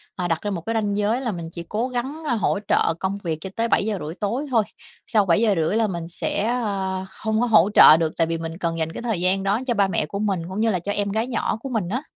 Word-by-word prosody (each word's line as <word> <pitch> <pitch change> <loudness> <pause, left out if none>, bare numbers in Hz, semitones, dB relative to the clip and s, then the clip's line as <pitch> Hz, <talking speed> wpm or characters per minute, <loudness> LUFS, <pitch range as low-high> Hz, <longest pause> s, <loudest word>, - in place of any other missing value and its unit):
à, 180 -1 -2
đặt 165 -2 -1
ra 205 - -3
một 170 -4 -3
cái 230 - -1
ranh 205 -2 0
giới 215 +5 +1
là 235 -4 -1
mình 170 -3 -6
chỉ 170 - -7
cố 225 +4 -1
gắng, 265 +6 -4
a, 240 - +1
hỗ 205 -1 0
trợ - - +2
công 190 +1 -2
việc 160 -3 -2
cho 190 - -6
tới 230 0 0
7:30 195 -9 0
tối 235 +8 -1
thôi. 225 -3 +4 0.4
Sau 210 -3 +2
7:30 190 -1 +2
là 225 -1 +2
mình 170 -3 -5
sẽ, 200 +4 -2
ơ, 195 -6 -2
không 220 +1 -2
có 245 - +2
hỗ 210 -4 +5
trợ 155 - +9
được, 160 -1 0
tại 165 -1 +2
vì 165 0 -1
mình 165 0 -6
cần 165 -2 -2
dành 160 0 -1
cái - - -6
thời 220 -7 -1
gian 190 +1 +2
đó 200 +4 +1
cho 240 - +2
ba 200 -3 +2
mẹ 170 -4 0
của 200 +6 -5
mình 195 -5 0
cũng 190 +3 -4
như 225 0 +2
là 180 - 0
cho 200 +4 -4
em 200 0 0
gái 220 +3 0
nhỏ 235 -3 -1
của 270 - -6
mình 210 -8 -2
á. 250 +6 -1
200 Hz, 280 wpm, -23 LUFS, 170-225 Hz, 0.4 s, trợ